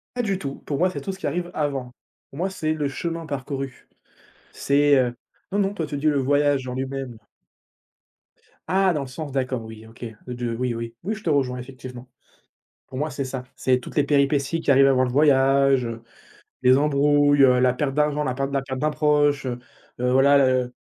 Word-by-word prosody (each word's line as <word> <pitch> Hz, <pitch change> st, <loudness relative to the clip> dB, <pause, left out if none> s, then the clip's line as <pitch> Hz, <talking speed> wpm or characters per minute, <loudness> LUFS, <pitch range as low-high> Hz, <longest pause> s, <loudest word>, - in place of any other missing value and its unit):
Pas 245 Hz, -, 0 dB
du 195 Hz, -3 st, -1 dB
tout, 140 Hz, -4 st, -5 dB
pour 145 Hz, -, -2 dB
moi 180 Hz, +1 st, +3 dB
c'est -, -, -6 dB
tout 195 Hz, -, -4 dB
ce 190 Hz, -, -10 dB
qui -, -, -3 dB
arrive 175 Hz, 0 st, -3 dB
avant. 140 Hz, -4 st, -2 dB, 0.4 s
Pour 135 Hz, -, -12 dB
moi 190 Hz, -, 0 dB
c'est 155 Hz, -4 st, -2 dB
le 150 Hz, -2 st, -1 dB
chemin 165 Hz, +4 st, -4 dB
parcouru. 135 Hz, -2 st, -5 dB, 0.6 s
C'est, 145 Hz, 0 st, +3 dB
heu, 125 Hz, -2 st, +1 dB, 0.4 s
non, 200 Hz, -, 0 dB
non, 195 Hz, 0 st, +1 dB
toi 165 Hz, -5 st, -3 dB
tu 145 Hz, -, -4 dB
dis 145 Hz, +2 st, -1 dB
le 145 Hz, -2 st, +3 dB
voyage 145 Hz, -1 st, +1 dB
en 125 Hz, -, -4 dB
lui-même. 130 Hz, -2 st, -5 dB, 1.5 s
Ah, 190 Hz, 0 st, +3 dB
dans 150 Hz, -, -1 dB
le -, -, -8 dB
sens, 140 Hz, +3 st, -7 dB
d'accord. 130 Hz, -3 st, -2 dB
Oui, 110 Hz, 0 st, -11 dB
OK, 115 Hz, +2 st, -10 dB, 0.2 s
de 120 Hz, -1 st, -3 dB
oui, 125 Hz, 0 st, -1 dB
oui, 115 Hz, 0 st, -5 dB
oui 210 Hz, -, -2 dB
je 210 Hz, -, -12 dB
te 165 Hz, -, -1 dB
rejoins 130 Hz, -4 st, +1 dB
effectivement. 125 Hz, -1 st, -10 dB, 0.8 s
Pour 130 Hz, -, -8 dB
moi 150 Hz, +3 st, -1 dB
c'est 140 Hz, 0 st, -4 dB
ça, 130 Hz, -1 st, -5 dB
c'est 130 Hz, -1 st, +1 dB
toutes -, -, -11 dB
les 145 Hz, -, +3 dB
péripéties 140 Hz, +2 st, +1 dB
qui -, -, -4 dB
arrivent 135 Hz, 0 st, +6 dB
avant 130 Hz, -1 st, +3 dB
le 125 Hz, -, 0 dB
voyage, 135 Hz, -1 st, +4 dB
heu, 115 Hz, 0 st, -6 dB, 0.6 s
les 130 Hz, 0 st, +5 dB
embrouilles, 145 Hz, 0 st, +3 dB, 0.2 s
la 125 Hz, -1 st, +4 dB
perte 135 Hz, 0 st, -2 dB
d'argent, 150 Hz, 0 st, +1 dB
la 130 Hz, -, -1 dB
perte 135 Hz, +1 st, -2 dB
de -, -, -8 dB
la 135 Hz, -, +1 dB
perte 130 Hz, -1 st, -5 dB
d'un 155 Hz, -, +1 dB
proche, 145 Hz, -2 st, +2 dB
heu, 125 Hz, -1 st, -3 dB, 0.4 s
voilà 135 Hz, +3 st, +4 dB
le 130 Hz, -2 st, +2 dB
140 Hz, 205 wpm, -23 LUFS, 130-150 Hz, 1.5 s, arrivent